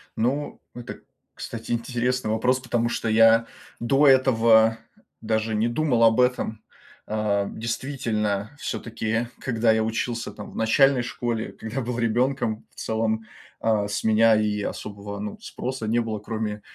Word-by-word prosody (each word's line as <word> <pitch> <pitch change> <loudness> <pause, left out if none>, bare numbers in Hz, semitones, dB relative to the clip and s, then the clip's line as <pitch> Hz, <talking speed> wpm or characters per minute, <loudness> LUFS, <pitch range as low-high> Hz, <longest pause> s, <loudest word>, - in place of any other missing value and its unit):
Ну 135 +6 -1
это, 120 -1 -8 0.3
кстати, 115 0 -7
интересный 120 0 -1
вопрос, 125 +4 +2
потому 120 -2 -1
что 115 - -2
я 115 +1 +5 0.3
до 135 +5 +3
этого 115 -4 +5 0.4
даже 110 0 -1
не 110 +2 +2
думал 120 -2 +1
об 115 +1 +5
этом. 125 -3 0 0.5
Э, 105 -2 0
действительно, 115 -2 -2
все-таки 115 -1 -2
когда 115 -3 +1
я 110 0 +2
учился 115 +1 -2
там - - -10
в - - -14
начальной 130 +4 +4
школе, 120 -2 -3
когда 115 +4 -5
был 120 0 -3
ребенком, 115 -1 0
в - - -31
целом, 110 0 -1 0.3
а, 110 -2 +1
с 100 - -3
меня 110 0 +5
и 105 -1 0
особого, 100 0 -6
ну, 105 0 -6
спроса 125 -3 -5
не 115 - +1
было, 110 -2 -2
кроме, 105 -1 -4
115 Hz, 145 wpm, -24 LUFS, 110-120 Hz, 0.5 s, я